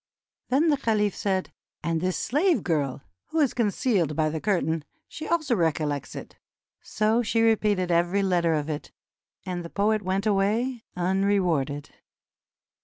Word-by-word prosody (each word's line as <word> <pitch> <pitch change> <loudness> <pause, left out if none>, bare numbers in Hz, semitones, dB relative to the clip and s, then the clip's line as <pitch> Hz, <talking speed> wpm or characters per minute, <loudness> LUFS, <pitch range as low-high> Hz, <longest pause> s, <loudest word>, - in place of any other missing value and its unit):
Then 295 +6 +3
the 290 - +3
caliph 210 -5 +1
said: 190 -2 -1 0.3
"And 165 -1 0
this 185 0 0
slave 325 +6 +1
girl, 145 -6 -1 0.2
who 320 - -2
is 285 -5 +3
concealed 205 - +1
by 155 0 +1
the 155 0 -4
curtain, 165 -6 0 0.2
she 315 - -7
also 315 -6 +1
recollects 155 - -1
it." - - -9 0.4
So 215 +2 +1
she 225 0 +1
repeated 210 -5 +2
every 175 +4 +2
letter 175 -4 +2
of 150 -1 -2
it, 155 0 -5 0.5
and 180 -2 -4
the 170 - -8
poet 210 +3 +1
went 190 +2 -1
away 220 +5 +1
unrewarded. 180 -6 0
195 Hz, 145 wpm, -26 LUFS, 165-220 Hz, 0.5 s, Then